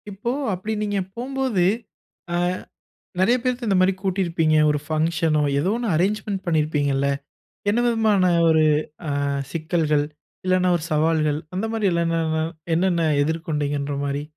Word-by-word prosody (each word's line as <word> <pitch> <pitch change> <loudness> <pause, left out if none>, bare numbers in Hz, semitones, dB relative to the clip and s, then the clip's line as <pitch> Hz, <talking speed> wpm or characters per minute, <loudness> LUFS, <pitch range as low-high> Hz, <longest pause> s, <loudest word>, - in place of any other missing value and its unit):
இப்போ 205 +4 -3 0.2
அப்டி 190 +4 -3
நீங்க 205 -1 -1 0.2
போம்போது, 255 -6 0 0.7
ஆ - - +1 0.8
நெறைய 225 +6 +4
பேருக்கு 250 -1 -2
இந்த 195 -2 +3
மாரி 185 +1 +4
கூட்டியிருப்பீங்க. 175 -5 +1 0.2
ஒரு 150 - -1
பங்ஷனோ, 155 -1 +1 0.2
ஏதோ 180 +7 +1
ஒண்ணு 240 -1 -3
அரேஞ்ச்மென்ட் 195 +2 -1
பண்ணியிருப்பீங்கள்ல. 150 -4 +1 0.6
என்ன 215 +3 +2
விதமான 215 -6 +3 0.2
ஒரு 160 -1 +4 0.4
அ - - -2 0.4
சிக்கல்கள், 155 -3 0 0.4
இல்லன்னா 185 0 +2
ஒரு 160 - -8
சவால்கள் 155 -1 +2 0.2
அந்த 195 +4 -1
மாரி 220 -2 -1
இல்லல்ன 165 -1 +1 0.5
என்னென்ன 170 -1 +2 0.2
எதிர்கொண்டீங்கன்ற 145 -2 -2
மாரி. 140 +1 -2
170 Hz, 125 wpm, -23 LUFS, 155-200 Hz, 0.8 s, நெறைய